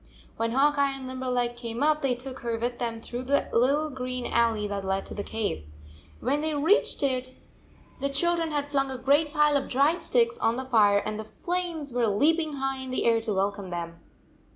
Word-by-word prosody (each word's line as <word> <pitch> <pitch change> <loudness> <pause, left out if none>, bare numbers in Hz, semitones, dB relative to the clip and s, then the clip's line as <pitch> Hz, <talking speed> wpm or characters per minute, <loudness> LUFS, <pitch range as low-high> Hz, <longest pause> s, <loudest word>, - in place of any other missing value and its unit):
When 230 0 -1
Hawk 285 +2 +3
Eye 275 -1 +2
and 265 - -8
Limberleg 250 -2 -1
came 235 +1 -4
up, 305 0 +3
they 265 -3 +1
took 255 +1 -8
her 235 -1 -2
with 240 +1 -3
them 230 -2 -2
through 240 +2 -6
the 275 +2 +1
little 285 +6 +2
green 255 -1 -4
alley 225 -3 +1
that 200 -1 -3
led 190 0 -1
to - - -7
the 205 - -3
cave. 205 - -3 0.6
When 280 +4 0
they 310 -1 -1
reached 320 +3 +2
it 255 -1 -1 0.6
the 280 - 0
children 335 +3 +1
had 290 -1 -2
flung 275 -1 +1
a 260 - -3
great 285 +4 +2
pile 300 -1 +3
of 280 - 0
dry 285 +6 +3
sticks 235 -7 +1
on 225 - +2
the 260 +1 -4
fire, 210 -5 +4
and 215 0 -3
the - - -4
flames 335 +2 -3
were 240 -2 +2
leaping 310 +9 +2
high 270 -1 -2
in 260 0 -6
the 255 - -1
air 230 -1 +3
to 220 -1 -3
welcome 200 0 -1
them. 170 -1 -5
255 Hz, 210 wpm, -27 LUFS, 230-285 Hz, 0.6 s, fire